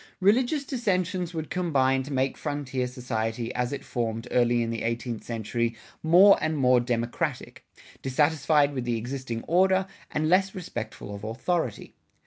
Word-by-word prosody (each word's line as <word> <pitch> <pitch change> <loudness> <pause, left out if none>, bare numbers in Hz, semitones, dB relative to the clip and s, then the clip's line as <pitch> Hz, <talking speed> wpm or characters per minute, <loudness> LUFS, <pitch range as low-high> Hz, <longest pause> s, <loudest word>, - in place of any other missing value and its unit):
Religious 245 +9 +3
dissensions 185 - -1
would 160 -3 -5
combine 135 -7 +2
to 140 +2 -7
make 135 0 0
frontier 140 -4 -3
society 120 -2 -3
as 125 0 -1
it 140 - -5
formed 115 -1 -3
early 120 -1 +3
in 115 - -2
the 115 - -3
eighteenth 115 0 -3
century 115 0 -2 0.3
more 185 +5 +7
and 155 0 0
more 125 -2 +4
democratic, 120 +4 -3 0.3
dissatisfied 145 +1 +2
with 130 -3 -2
the 120 -1 -1
existing 120 0 -4
order, 190 +2 +3 0.2
and 155 +1 -1
less 190 +3 +3
respectful 120 - -6
of 100 +1 -8
authority. 125 - -2
130 Hz, 145 wpm, -27 LUFS, 120-170 Hz, 0.3 s, more